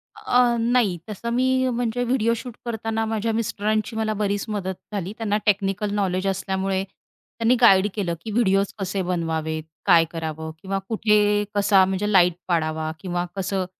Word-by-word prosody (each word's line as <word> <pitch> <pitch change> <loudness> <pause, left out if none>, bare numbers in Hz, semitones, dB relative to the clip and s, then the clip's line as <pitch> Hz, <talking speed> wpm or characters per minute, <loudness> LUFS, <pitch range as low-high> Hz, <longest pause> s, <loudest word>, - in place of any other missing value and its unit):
अ, 245 -1 +2
नाही 230 -6 +2
तसं 225 +3 -5
मी 260 +1 +2
म्हणजे 245 0 -1
व्हिडिओ 230 -2 +1
शूट 240 0 -8
करताना 225 -1 -2
माझ्या 220 0 -1
मिस्टरांची 215 0 -1
मला 220 -1 0
बरीच 205 -1 -1
मदत 190 -3 -3 0.2
झाली. 195 0 -3
त्यांना 210 -2 0
टेक्निकल 200 0 +1
नॉलेज 185 -1 0
असल्यामुळे 190 0 -1
त्यांनी 230 +4 -3
गाईड 195 -3 +6
केलं 190 -5 -2
की 220 - -6
व्हिडिओज 200 -3 +2
कसे 195 0 -2
बनवावेत, 160 -3 -2 0.2
काय 170 -4 +6
करावं 160 -1 -5
किंवा 195 0 -2
कुठे 210 -2 +3
कसा 200 -1 +5
म्हणजे 195 +2 -1
लाईट 180 -2 +5
पाडावा 155 -2 -1
किंवा 175 -2 -2
कसं 195 0 -1
200 Hz, 150 wpm, -23 LUFS, 185-225 Hz, 0.2 s, गाईड